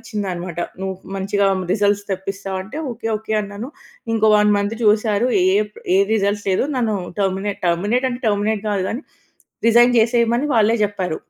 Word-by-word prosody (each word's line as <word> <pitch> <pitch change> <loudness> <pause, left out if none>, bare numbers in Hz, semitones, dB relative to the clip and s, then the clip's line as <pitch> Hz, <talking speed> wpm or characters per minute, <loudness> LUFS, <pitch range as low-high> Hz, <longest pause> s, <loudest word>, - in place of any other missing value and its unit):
ఇచ్చిందనమాట. 185 -5 -5 0.2
నువ్వు 190 0 -3 0.2
మంచిగా 200 +1 0 0.3
రిజల్ట్స్ 205 0 +1
తెప్పిస్తావా? 195 0 -4
అంటే, 220 +10 -8
ఓకె, 225 0 -5
ఓకె 220 0 -4
అన్నాను. 205 +5 -7 0.4
ఇంకో 220 -1 +3
1 210 0 +4
మంత్ 205 +2 -1
చూసారు. 215 +2 +2 0.3
ఏప్ 210 0 -1 0.2
ఏ - - +4 0.2
రిజల్ట్స్ 205 -1 0
లేదు. 185 - +1
నన్ను 225 -4 0 0.2
టెర్మినేట్ 195 +1 -1
టెర్మినేట్ 205 +10 +1
అంటే, 245 0 -5
టెర్మినేట్ 205 0 0
కాదు 195 -2 0
గానీ, 245 +6 -4 0.6
రిజైన్ 240 +2 +6
జేసేయమని 235 +3 +2
వాళ్ళే 225 0 +4
చెప్పారు. 195 -5 -1
205 Hz, 150 wpm, -20 LUFS, 195-225 Hz, 0.6 s, రిజైన్